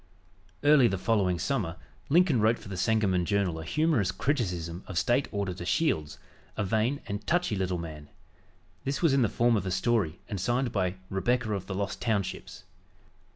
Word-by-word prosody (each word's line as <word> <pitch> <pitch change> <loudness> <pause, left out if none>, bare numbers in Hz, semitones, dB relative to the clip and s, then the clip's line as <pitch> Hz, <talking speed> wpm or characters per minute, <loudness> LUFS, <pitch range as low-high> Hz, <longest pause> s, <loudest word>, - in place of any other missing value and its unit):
Early 145 -4 +6
the 95 - -1
following 95 -3 +1
summer 95 -2 -1 0.3
Lincoln 160 - +4
wrote 110 +2 +3
for - - -12
the 95 - -5
Sangamon 95 -2 +2
Journal 95 -4 0
a - - -6
humorous 120 - +1
criticism 90 - -2
of 95 - -5
State 120 +10 +2
Auditor 95 -4 -3
Shields, 85 - 0 0.4
a - - 0
vain 110 +8 0
and 100 +1 -5
"touchy" 175 -10 +1
little 95 -2 -1
man. 75 -3 -8 0.7
This 135 +4 -2
was 160 -5 +4
in 135 - +3
the 115 - +3
form 120 0 +2
of 100 -3 -1
a - - 0
story 95 -3 +1
and 100 -3 -4
signed 120 +4 0
by 95 -3 0 0.2
"Rebecca 115 +3 0
of 95 -2 -4
the 95 - -4
Lost 100 +1 -3
Townships." 100 -6 -2
100 Hz, 175 wpm, -28 LUFS, 90-120 Hz, 0.7 s, Early